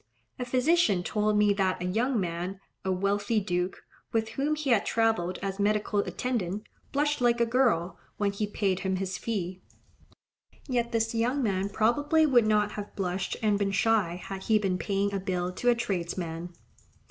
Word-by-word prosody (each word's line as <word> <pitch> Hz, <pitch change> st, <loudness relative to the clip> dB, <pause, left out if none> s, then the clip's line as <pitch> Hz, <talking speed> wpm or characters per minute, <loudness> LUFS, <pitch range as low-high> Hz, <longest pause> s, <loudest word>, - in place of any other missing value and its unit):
A 250 Hz, -, -2 dB
physician 250 Hz, -, +3 dB
told 210 Hz, +2 st, +1 dB
me 210 Hz, -1 st, +4 dB
that 190 Hz, -2 st, 0 dB
a 180 Hz, -, -3 dB
young 230 Hz, +6 st, +1 dB
man, 180 Hz, +1 st, -3 dB, 0.2 s
a 190 Hz, -, 0 dB
wealthy 200 Hz, +4 st, +1 dB
duke, 180 Hz, -2 st, -2 dB, 0.3 s
with 225 Hz, -1 st, 0 dB
whom 280 Hz, +6 st, 0 dB
he 295 Hz, -3 st, -1 dB
had 215 Hz, -4 st, +4 dB
travelled 220 Hz, -6 st, +1 dB
as 195 Hz, 0 st, -3 dB
medical 210 Hz, 0 st, +1 dB
attendant, 210 Hz, -3 st, -2 dB, 0.3 s
blushed 290 Hz, 0 st, +1 dB
like 240 Hz, -1 st, +3 dB
a 235 Hz, -, +4 dB
girl, 230 Hz, -8 st, +1 dB, 0.2 s
when 205 Hz, -1 st, +1 dB
he 205 Hz, +1 st, -2 dB
paid 195 Hz, -3 st, 0 dB
him 190 Hz, -1 st, -1 dB
his 190 Hz, 0 st, -3 dB
fee; 185 Hz, -5 st, -3 dB, 1.1 s
yet 240 Hz, -3 st, 0 dB
this 225 Hz, -1 st, 0 dB
young 245 Hz, +5 st, +1 dB
man 195 Hz, -2 st, 0 dB
probably 290 Hz, +10 st, +3 dB
would 245 Hz, -6 st, +4 dB
not 210 Hz, -1 st, +2 dB
have 205 Hz, -1 st, -7 dB
blushed 185 Hz, -1 st, -2 dB
and 210 Hz, -2 st, +2 dB
been 200 Hz, -1 st, +1 dB
shy, 195 Hz, -3 st, +2 dB
had 190 Hz, +1 st, -7 dB
he 220 Hz, -, +4 dB
been 190 Hz, -3 st, 0 dB
paying 200 Hz, +2 st, 0 dB
a 195 Hz, -, 0 dB
bill 180 Hz, -2 st, -2 dB
to 245 Hz, +7 st, 0 dB
a 240 Hz, -, +5 dB
tradesman. 175 Hz, -6 st, -3 dB
205 Hz, 175 wpm, -28 LUFS, 190-235 Hz, 1.1 s, a